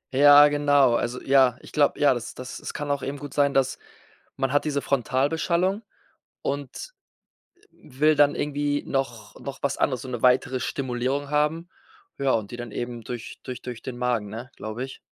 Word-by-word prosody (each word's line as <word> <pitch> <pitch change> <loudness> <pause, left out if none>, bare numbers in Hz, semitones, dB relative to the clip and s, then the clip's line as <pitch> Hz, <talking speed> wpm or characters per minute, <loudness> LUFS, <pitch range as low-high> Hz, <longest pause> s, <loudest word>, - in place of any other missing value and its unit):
Ja, 145 +1 +8
genau. 145 -3 +4
Also, 120 +1 -1
ja, 130 -2 +4
ich - - -13
glaube, 145 -2 +2
ja, 145 -2 +5
das 120 -2 -6
das 130 0 -7
es - - -6
kann 145 -1 -3
auch 140 -1 -1
eben 140 +1 -4
gut 145 0 -9
sein, 140 -1 +2
dass 135 -1 +1 0.6
man 135 0 -1
hat 145 - +3
diese 145 -2 -1
Frontalbeschallung 160 - 0 0.6
und, 140 - -5 0.6
äh, - - -33
will 150 +3 0
dann 145 0 +5
irgendwie 145 0 -1
noch 120 -6 -3
noch 140 -1 -7
was 140 - -1
anderes, 130 -3 0
so - - -8
'ne 120 -2 -5
weitere 130 0 +3
Stimulierung 130 +2 -2
haben. 150 +4 0 0.5
Ja, 135 -1 +1
und 105 -3 0
die 120 - -7
dann 120 -2 -7
eben 120 +1 -5
durch 120 0 -7
durch 130 -2 -7
durch 125 -2 -8
den 130 -2 -6
Magen, 120 -4 0
ne, 115 +4 -7
glaube 110 +3 -5
ich. 130 - -8
135 Hz, 185 wpm, -25 LUFS, 125-145 Hz, 0.6 s, Ja